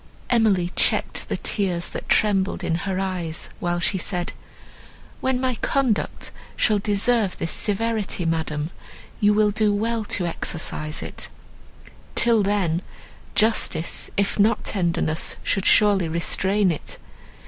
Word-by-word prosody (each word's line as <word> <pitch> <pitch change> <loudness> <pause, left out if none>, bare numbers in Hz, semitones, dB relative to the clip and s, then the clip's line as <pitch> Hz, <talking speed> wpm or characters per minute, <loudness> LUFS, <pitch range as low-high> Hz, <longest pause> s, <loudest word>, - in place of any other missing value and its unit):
Emily 200 -7 +3
checked - - +1
the - - -1
tears, 180 -5 -1
that - - -7
trembled 200 -2 +2
in - - 0 0.2
her 190 -1 -1
eyes, 180 -4 -3
while 175 0 -1
she 190 +2 +1
said, 175 0 0 0.9
"When 260 -1 0
my 255 0 0
conduct 250 -2 -1 0.2
shall 210 -2 +3
deserve 210 0 +1
this 165 - -2
severity, 210 -3 0
madam, 160 -1 -2 0.5
you 205 0 +4
will 210 -1 +3
do 210 0 +2
well 225 +2 0
to 185 -3 0
exercise 160 -2 -3
it; - - -5 0.9
till 230 -2 +3
then 190 -4 +1 0.5
justice, 215 -6 +2
if 200 +1 0
not 215 +3 +3
tenderness, 170 -4 -1
should 195 - +1
surely 200 -5 +5
restrain 190 +4 +1
it. 155 - -6
195 Hz, 125 wpm, -23 LUFS, 175-215 Hz, 0.9 s, surely